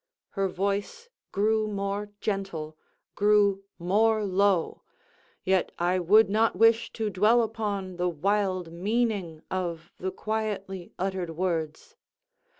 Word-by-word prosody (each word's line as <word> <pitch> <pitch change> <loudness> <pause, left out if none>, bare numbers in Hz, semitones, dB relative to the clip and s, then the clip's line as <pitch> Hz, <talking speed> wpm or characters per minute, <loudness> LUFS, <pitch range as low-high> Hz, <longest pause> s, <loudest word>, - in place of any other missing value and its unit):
Her 195 -1 -1
voice 200 - -3 0.2
grew 215 +1 +1
more 200 0 -3
gentle—grew 195 +2 0
more 215 +5 +2
low—yet 190 -1 -1
I 180 +2 +1
would 210 +6 +5
not 220 +1 +2
wish 225 +3 +4
to 220 -2 -2
dwell 220 +5 +4
upon 205 -5 -3
the 180 0 +1
wild 185 0 -1
meaning 200 -4 -1
of 170 -3 -3
the 190 - -2
quietly 200 -3 -4
uttered 185 -2 -2
words. 165 - -3
195 Hz, 105 wpm, -27 LUFS, 180-215 Hz, 0.2 s, would